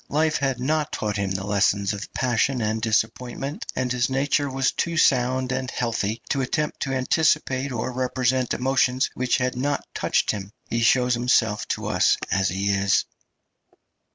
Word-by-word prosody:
Life 155 +1 +1
had 135 -3 -1
not 150 +4 0
taught 105 -1 -2
him 100 -1 -1
the 95 0 -3
lessons 100 0 +1
of 105 +1 -7
passion 125 +1 +1
and 110 0 -1
disappointment, 120 +5 -2
and 125 -1 -1
his 125 0 +1
nature 140 +2 +1
was 135 0 +1
too 170 0 -2
sound 130 -2 +2
and 130 0 -2
healthy 115 -3 -2
to 135 - +1
attempt 150 +4 -2
to 135 - -2
anticipate 135 -1 +1
or 120 +1 -3
represent 130 0 0
emotions 130 0 +1
which 125 -1 0
had 125 0 -1
not 140 +3 -1
touched - - +1
him; 100 -1 -7
he 115 - -1
shows 125 +1 +3
himself 120 -3 +1
to - - -3
us - - +3
as 95 -2 +2
he 100 +2 -1
is. 100 0 +2
125 Hz, 165 wpm, -24 LUFS, 110-135 Hz, -, shows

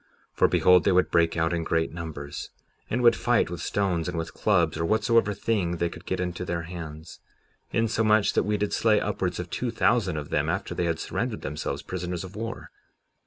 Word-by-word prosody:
57:14 - - -36
For - - +5
behold, 90 -1 +5
they 100 - +3
would 90 0 +3
break 85 0 +3
out 80 +1 +1
in 85 -1 -1
great 80 0 0
numbers, 80 -4 -6 0.4
and 125 +2 0
would 120 -1 +6
fight 120 -7 +1
with 85 - -5
stones, 90 -5 0
and - - -4
with 80 0 -4
clubs, 85 -7 +2
or - - 0
whatsoever 110 +3 +3
thing 95 -5 0
they 85 0 0
could 85 +1 -12
get 95 - -1
into 90 0 -3
their 85 -1 -3
hands, 80 -2 -8 0.5
insomuch 110 -2 +2
that - - +3
we 105 0 0
did 105 0 -1
slay 110 -2 +3
upwards - - -2
of - - -6
two - - -2
thousand 95 -9 +1
of 75 -1 -6
them - - +1
after - - -2
they 90 - -1
had 85 -1 -1
surrendered - - -3
themselves 75 +2 -4
prisoners 90 -1 -4
of 95 +1 -10
war. 115 +2 -6
90 Hz, 210 wpm, -26 LUFS, 85-105 Hz, 0.5 s, would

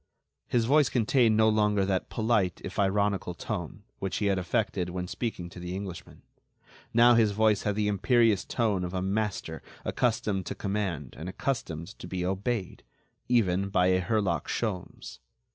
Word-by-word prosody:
His 120 -2 +1
voice 145 +3 +4
contained 115 -1 +3
no 110 0 +5
longer 105 -2 +2
that 95 -1 -1
polite, 110 -6 +1
if - - -5
ironical, 100 -2 +1
tone, 95 -1 -5 0.2
which 95 -1 -2
he 105 - -1
had 100 -2 +2
affected 90 0 -1
when 90 0 -4
speaking 100 -5 -4
to 90 - -10
the 90 +1 -5
Englishman. 95 -3 -8 0.7
Now, 120 +1 +6
his 110 -3 +4
voice 105 -1 +3
had 105 -1 -1
the 105 0 0
imperious 110 +1 +3
tone 105 -6 0
of 90 +1 -4
a 90 - -1
master 95 -5 -2 0.2
accustomed 105 -5 0
to - - -4
command 95 -9 -3
and 85 +3 -6
accustomed 95 - -3
to - - -8
be 90 -1 -3
obeyed—even 100 0 -2
by 90 -2 +3
a 95 0 +3
Herlock 105 +1 0
Sholmes. 100 -6 -4
100 Hz, 160 wpm, -28 LUFS, 90-110 Hz, 0.7 s, Now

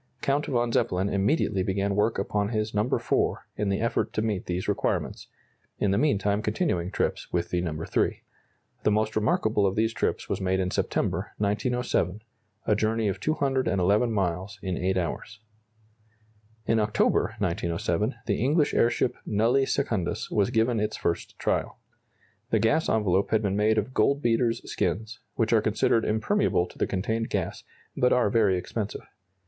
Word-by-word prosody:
Count 140 +2 +1
von 120 -2 0
Zeppelin 95 -2 +1
immediately 100 - +1
began 100 +1 0
work 105 +2 +1
upon 100 +1 -1
his 110 -1 -2
No. 105 0 +2
IV, - - -1 0.4
in 105 -1 -1
the 100 - 0
effort 115 +1 0
to 110 - 0
meet 110 -1 -2
these 90 +1 -2
requirements, - - -1 0.5
in 100 - +1
the 100 - +2
meantime 105 -8 +1
continuing 105 - -1
trips - - -2
with 85 0 -2
No. 85 -3 -1
III. - - -1 0.6
The - - +2
most 110 +1 0
remarkable 110 -1 +2
of 95 - -1
these 110 +1 +1
trips - - -1
was - - -2
made 95 0 +1
in 90 -1 -1
September, - - -1
1907, 105 -2 -1 0.4
a 105 - +3
journey 110 0 +1
of 95 - -3
211 125 - +1
miles 95 -1 -2
in 95 -2 -2
8 95 +2 0
hours. 95 +5 -4 1.3
In 115 0 +2
October, 105 0 +1
1907, 85 +6 -1
the 105 0 0
English 150 +3 +2
airship 120 +1 +2
"Nulli 120 +6 +2
Secundus" 110 -6 -1
was 105 0 +2
given 115 -1 +1
its 105 +1 -1
first 85 - -3
trial. - - -1 0.7
The 115 - +3
gas 130 +10 +2
envelope 100 -3 +2
had 110 -1 +2
been 100 -1 0
made 110 +2 +2
of 110 +5 -1
goldbeater's 120 -1 +1
skins, 110 +3 -2 0.2
which 115 -1 +1
are 110 - +5
considered 110 +1 +2
impermeable 110 - +1
to - - -16
the - - +1
contained 110 +4 -2
gas, - - -3 0.3
but 125 - +2
are 125 -5 +3
very 105 -5 +3
expensive. 105 +3 -4
105 Hz, 160 wpm, -26 LUFS, 95-115 Hz, 1.3 s, are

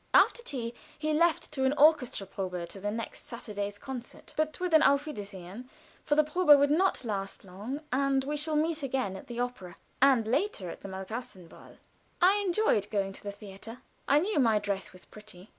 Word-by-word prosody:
After 480 - +5
tea 245 - -4 0.2
he 310 0 -1
left 325 -1 +2
for 265 -3 -1
an 265 +1 +3
orchestra 290 -8 +4
probe 180 -2 -4
to 195 - -10
the 205 +2 -2
next 225 +2 -6
Saturday's 205 -3 -5
concert; 255 -1 -9
but 310 0 -1
with 360 -2 -2
an 315 - +7
auf 280 -1 +4
wiedersehen, 205 - -8 0.3
for 295 - +1
the 305 - +5
probe 350 +5 -2
will 285 - +4
not 335 -3 +2
last 195 -3 -4
long, 210 +10 -6
and 270 0 +2
we 295 +2 -2
shall 305 +1 0
meet 315 +1 +1
again 260 -8 -1
at 190 - -10
the 240 -1 -6
opera 220 -8 -4 0.3
and 265 -5 +5
later 250 - -1
at - - -11
the - - -7
Malkasten 190 0 -7
Ball. - - -16 0.4
I 380 +3 +5
enjoyed 370 - +1
going 195 -2 -1
to - - -11
the 205 - -5
theater. 205 +3 -11 0.2
I 280 - +5
knew 365 +2 +1
my 225 -5 +4
dress 200 -2 -2
was 185 - -14
pretty. 210 -3 -14
245 Hz, 195 wpm, -29 LUFS, 200-300 Hz, 0.4 s, an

